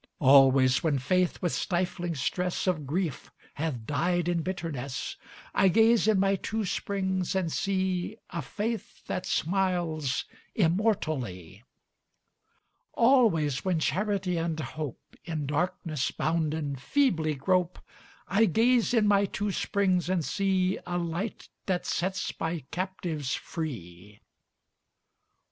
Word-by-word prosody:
Always 135 -1 +6
when 155 -4 +2
Faith 180 +9 0
with 175 - +1
stifling 175 -2 -1
stress 180 +6 -1
Of 160 -7 0
grief 165 -1 -2 0.2
hath 140 -7 -3
died 175 +6 0
in 175 -1 +1
bitterness, 155 -7 -4 0.4
I 195 - +4
gaze 225 +3 +4
in 215 -3 +4
my 195 0 +3
two 220 +2 -2
springs 190 -1 -1
and 180 -4 0
see 190 +2 -1
A 170 - -3
Faith 210 - -4
that 185 0 -3
smiles 175 -6 0 0.3
immortally. 155 - 0 1.3
Always 220 - +3
when 185 -3 +1
Charity 190 +3 0
and 165 -1 -2
Hope, 150 -1 -6
In 155 -3 -3
darkness 160 -1 -1
bounden, 155 -3 -1
feebly 160 - +1
grope, 180 +5 +1 0.5
I 210 +3 +4
gaze 235 +5 +3
in 215 -2 +4
my 200 -1 +4
two 205 +1 -2
springs 185 -3 +1
and 180 -4 +1
see 190 -1 +1
A 175 0 -1
Light 175 +5 -3 0.2
that 185 -2 0
sets 190 +2 -1
my 165 0 -2
captives 175 -6 -3
free. 105 - -7
175 Hz, 120 wpm, -28 LUFS, 150-190 Hz, 1.3 s, Always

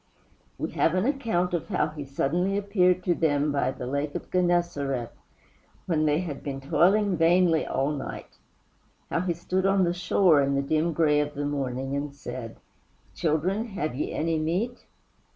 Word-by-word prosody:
We - - -3
have 165 - +1
an 185 +3 +1
account 225 -11 0
of 170 - -2
how 180 -6 0
he 150 -2 -7
suddenly 175 +8 0
appeared 185 -3 +2
to 175 - +2
them 150 -3 +1
by 140 -3 +1
the 130 - -5
Lake 140 +3 -2
of - - -6
Genesareth, 170 -9 0 0.7
when 155 -3 +1
they 150 +3 +2
had 155 -6 -5
been 135 -1 -5
vainly 175 +1 +3
toiling - - -7
all 135 +3 0
night 145 -3 -7 0.7
how - - +1
he 180 0 0
stood 185 +3 -1
on 195 -1 +3
the 175 -1 +1
shore 175 -3 +3
in 140 0 +1
the 140 - +1
dim 155 +4 +1
gray 150 -2 +3
of 150 -1 -2
morning 135 -2 -2
and 140 0 -4
said, 125 -4 -7 0.6
"Children, 180 +8 0
have 170 - -3
ye 135 - -3
any 160 0 0
meat?" 185 +11 -2
160 Hz, 170 wpm, -26 LUFS, 140-180 Hz, 0.7 s, vainly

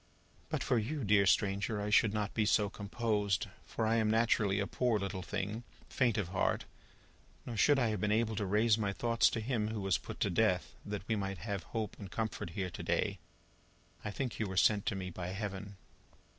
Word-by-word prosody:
"But - - -1
for 120 - +2
you, 135 +6 -3
dear 100 -1 +4
stranger, 100 +3 +2
I 105 +1 -2
should 110 0 +5
not 105 -1 -2
be 110 -2 +1
so 105 -2 +3
composed, 105 -2 0 0.2
for 110 - -2
I 115 +1 +3
am 110 -1 +2
naturally 110 -3 +3
a 100 - +1
poor 120 +1 +1
little 100 -1 -3
thing, 105 +5 -3 0.3
faint 120 -4 +2
of 100 -5 -1
heart; 95 - 0 0.8
nor 120 - -5
should 145 +6 +5
I 120 -4 +2
have 105 -3 -2
been 105 - +1
able 110 0 +1
to 100 - 0
raise 105 +3 +3
my 100 -2 0
thoughts 115 +2 +3
to - - -2
Him 110 -2 -1
who 110 0 -3
was 95 -1 +1
put - - -8
to - - +2
death, 90 -2 +1
that 105 0 -5
we 110 - +1
might 95 -2 -3
have 100 +2 -3
hope 110 -2 -4
and 100 - -7
comfort 110 -3 -3
here 95 -2 -2
to - - -7
day. - - 0 0.8
I - - -3
think 125 +4 -3
you 110 - 0
were 95 -1 -5
sent 105 +1 +4
to 105 - +1
me 90 -1 -4
by 85 0 -5
Heaven." 100 +1 -5
105 Hz, 210 wpm, -33 LUFS, 100-110 Hz, 0.8 s, should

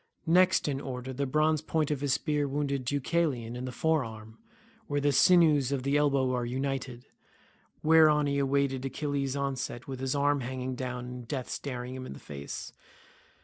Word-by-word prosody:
Next 180 +2 +4
in 140 -1 -1
order 130 -1 -5
the 140 +2 -2
bronze 155 +2 +2
point 155 -1 -1
of 145 -2 -2
his 140 -2 +1
spear 150 0 0
wounded 140 -1 -2
Deucalion 140 -3 -1
in 125 +1 -5
the 130 - -4
fore 160 +3 +1
arm 110 -1 -10 0.5
where 145 0 0
the 145 0 +2
sinews 150 -5 +5
of 135 -2 -1
the 140 +1 +1
elbow 140 -3 +2
are 125 -1 0
united, 130 0 -3 0.8
whereon 155 -2 +6
he 140 0 +1
waited 135 -1 +1
Achilles' 140 0 -2
onset 135 -3 -3
with 135 -2 -5
his 130 +1 -1
arm 145 0 +2
hanging 130 +1 -4
down 125 -1 -4
and 125 -1 -8
death 130 0 -4
staring 125 -2 -5
him 130 0 -6
in - - -7
the - - -11
face. 70 0 -7
135 Hz, 180 wpm, -29 LUFS, 125-145 Hz, 0.8 s, whereon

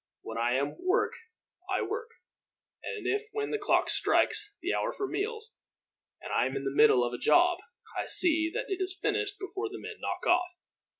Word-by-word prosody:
When 115 0 -5
I 120 +1 +2
am 140 +2 +1
at - - -14
work 370 +1 +1 0.6
I - - +1
work, 465 +1 -4 0.7
and 435 - -5
if 415 +2 0
when 430 0 -2
the 435 - -1
clock 410 - +2
strikes 410 - +1
the 360 +3 -1
hour - - 0
for 400 - -3
meals 440 +3 -3 0.7
I - - +2
am 130 - -5
in 135 - -2
the 135 0 -2
middle 130 -5 +6
of 120 0 -2
a 120 - -4
job, 355 0 +4 0.4
I - - -2
see 320 -2 +3
that - - -2
it 385 -2 -3
is 370 0 -2
finished 420 -1 0
before 405 +2 -4
the 400 - -7
men 435 0 -8
knock - - -4
off. 355 0 +3
385 Hz, 195 wpm, -30 LUFS, 320-425 Hz, 0.7 s, middle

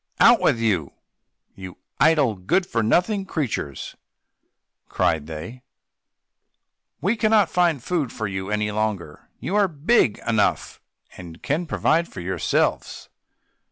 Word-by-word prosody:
"Out - - +7
with - - +2
you, 100 -11 -1 0.6
you 95 -2 -10 0.2
idle, 150 -7 +4
good 100 - 0
for 115 - -1
nothing 180 - +1
creatures!" 125 - -4 0.9
cried 75 -2 0
they; 85 +11 -8 1.4
"we 200 +9 +1
cannot 215 -5 +2
find 170 -8 +1
food 160 -9 -2
for 110 - -5
you 95 0 -5
any 105 0 -1
longer; 105 -7 -4
you 190 - -3
are 205 -1 +4
big 155 - +2
enough, 110 -2 0 0.4
and 85 -2 -11
can 155 +5 -1
provide 165 +2 +1
for - - -10
yourselves." 90 +2 -1
115 Hz, 125 wpm, -23 LUFS, -, 1.4 s, Out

